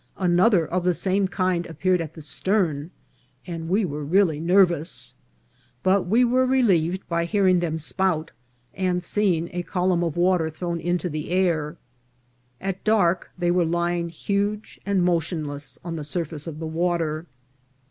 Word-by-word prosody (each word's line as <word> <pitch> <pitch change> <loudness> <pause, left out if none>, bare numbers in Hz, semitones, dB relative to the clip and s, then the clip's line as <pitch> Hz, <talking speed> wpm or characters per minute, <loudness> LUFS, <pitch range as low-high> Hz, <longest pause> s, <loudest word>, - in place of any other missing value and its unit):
Another 180 0 +3
of 180 +3 -2
the 180 -1 +2
same 190 +2 +1
kind 185 -2 -1
appeared 180 +3 0
at 160 -1 -7
the 160 - -9
stern, 165 -2 0 0.6
and 165 -2 -5
we 200 +3 +2
were 150 -2 -4
really 165 0 +2
nervous; 175 -2 +2 0.7
but 190 0 +2
we 235 +6 +4
were 255 +2 +2
relieved 190 -9 +2
by 170 0 0
hearing 185 -1 +3
them 165 -2 -1
spout, 165 0 -1 0.4
and 180 -1 -1
seeing 180 -4 +1
a 175 - -2
column 180 -1 0
of 165 -1 -2
water 175 -2 +2
thrown 170 +2 -4
into 175 +2 -1
the 155 -2 -5
air. 170 -4 0 0.8
At 195 -1 -4
dark 190 -5 +2
they 175 -1 +1
were 180 0 +3
lying 170 +1 0
huge 205 +5 -2
and 195 -3 +2
motionless 155 -5 -2
on 165 -1 -4
the 155 - -4
surface 155 0 -4
of 155 -2 -6
the 160 - -5
water. 165 -1 -1
175 Hz, 155 wpm, -24 LUFS, 165-185 Hz, 0.8 s, we